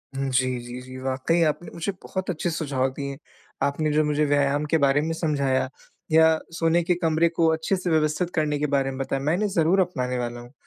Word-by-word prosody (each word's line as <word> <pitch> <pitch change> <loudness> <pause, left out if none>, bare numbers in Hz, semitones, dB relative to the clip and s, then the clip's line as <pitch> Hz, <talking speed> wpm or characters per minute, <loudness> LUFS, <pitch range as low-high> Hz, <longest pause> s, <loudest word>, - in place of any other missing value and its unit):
हुँ, 135 0 -1
जी, 130 -1 +1
जी, 120 +1 -8
जी। 130 0 -10
वाक़ई 135 +6 0
आपने 160 +2 -1
मुझे 170 +4 -2
बहुत 190 0 -4
अच्छे 175 0 -1
सुझाव 140 -5 -1
दिए, 140 0 -5 0.5
आपने 145 +2 0
जो 155 - +3
मुझे 150 0 +1
व्यायाम 145 0 +1
के - - +6
बारे 140 -1 +3
में 160 +2 -2
समझाया 140 -5 0 0.4
या 160 0 +6 0.2
सोने 165 +1 +3
के 175 +1 +1
कमरे 165 0 +3
को 165 0 +1
अच्छे 160 +4 0
से 180 -1 -3
व्यवस्थित 155 +2 +1
करने 150 -2 0
के 150 - 0
बारे 135 -1 +1
में 130 - -7
बताया, 135 0 -2
मैं 155 +3 +1
इन्हें 205 +3 0
ज़रूर 175 0 +2
अपनाने 125 -8 -2
वाला 120 -1 -3
हूँ। 120 +2 -14
150 Hz, 215 wpm, -24 LUFS, 135-165 Hz, 0.5 s, के